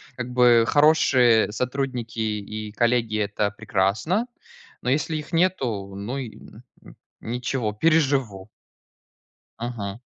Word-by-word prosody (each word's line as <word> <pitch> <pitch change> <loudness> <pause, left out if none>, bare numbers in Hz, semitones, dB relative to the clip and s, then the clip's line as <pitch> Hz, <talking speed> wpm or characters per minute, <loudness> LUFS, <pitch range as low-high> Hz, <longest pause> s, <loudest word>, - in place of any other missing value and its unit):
как 125 -1 -5
бы 120 -2 +5
хорошие 130 -7 +4
сотрудники 125 -1 -3
и 105 0 -4
коллеги- 115 -1 +1
это 100 0 -1
прекрасно. 110 - 0 0.5
Но - - -2
если 150 +4 0
их 150 +1 -8
нету, 125 - 0
ну 105 +7 -5
и 125 -5 -7
м, 110 - -15 0.6
ничего, 120 -1 -3
переживу 135 -7 +1 1.1
Мгм. 115 -3 -5
120 Hz, 105 wpm, -24 LUFS, 105-135 Hz, 1.1 s, бы